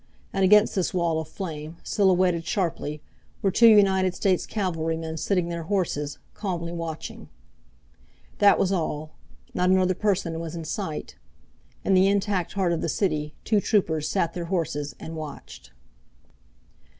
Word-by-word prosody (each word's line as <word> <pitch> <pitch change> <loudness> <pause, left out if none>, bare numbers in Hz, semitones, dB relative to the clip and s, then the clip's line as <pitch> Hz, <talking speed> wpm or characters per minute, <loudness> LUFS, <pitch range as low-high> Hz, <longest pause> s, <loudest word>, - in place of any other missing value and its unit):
And 195 - +1
against 210 +3 +6
this 185 -2 -1
wall 170 -3 +1
of 160 - -8
flame, 160 -3 -6
silhouetted 185 -4 +2
sharply, 165 -6 -2 0.4
were 195 - +3
two 230 +5 +6
United 190 -4 +5
States 190 -3 +1
cavalrymen 165 -5 -2
sitting 180 +1 0
their 170 -1 -3
horses, 150 -7 -1 0.2
calming 175 -4 -4
watching. 165 -2 -6 1.1
That 205 -1 +6
was 190 - +1
all. 155 -4 -2 0.4
Not 180 0 +1
another 185 0 +4
person 185 -4 -1
was 165 0 -5
in 165 -1 -5
sight. 160 -2 -5 0.7
In 195 - +3
the 190 +1 +5
intact 200 -3 0
heart 185 -3 +1
of 165 - -2
the - - -1
city 155 -5 -1
two 210 -2 +2
troopers 160 -9 +1
sat 170 -4 0
their 175 -2 -4
horses 165 -5 -2
and 160 - -7
watched. 155 -2 -9
175 Hz, 145 wpm, -25 LUFS, 160-195 Hz, 1.1 s, against